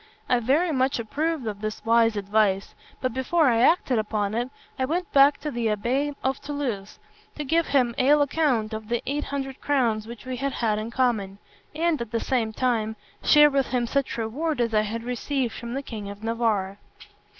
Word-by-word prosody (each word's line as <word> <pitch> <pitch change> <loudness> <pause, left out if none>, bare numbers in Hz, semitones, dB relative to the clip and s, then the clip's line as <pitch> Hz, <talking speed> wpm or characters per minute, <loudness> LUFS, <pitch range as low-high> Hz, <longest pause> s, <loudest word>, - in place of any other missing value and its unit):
I 250 - +3
very 290 +9 +2
much 265 -1 +1
approved 290 +5 -2
of 210 -2 -4
this 215 0 -5
wise 225 -1 +4
advice; 200 -1 +1 0.3
but 255 -3 -1
before 275 +4 +2
I 230 -1 +2
acted 260 -4 +3
upon 210 -1 -1
it, 240 +3 -1 0.3
I 260 - +2
went 340 +5 -2
back 280 +1 +6
to 300 - -3
my 240 - -5
abbé 240 +6 0
of 265 0 -1
Toulouse, 275 -9 -4 0.4
to 300 - -4
give 325 +4 +1
him 250 -4 +2
an 285 +3 +5
account 280 -7 +1
of 220 0 -6
the 240 0 -1
eight 290 +2 -2
hundred 270 -1 -5
crowns 235 -7 +1
which 235 +1 -10
we 255 -1 -4
had 275 +1 -2
had 215 -3 0
in 220 +1 -4
common, 230 -6 0 0.4
and, 330 -3 +1
at 235 - -4
the 230 - -1
same 230 -4 0
time, 220 -2 0 0.3
share 295 -1 +7
with 275 -1 +1
him 250 -2 0
such 265 -1 -1
reward 270 +7 -2
as 230 -2 0
I 215 - +4
had 225 +2 -4
received 250 0 -2
from 235 +1 -6
the 275 - -3
king 215 -6 -6
of 200 +1 -10
Navarre. 220 -4 0
245 Hz, 195 wpm, -25 LUFS, 220-280 Hz, 0.4 s, share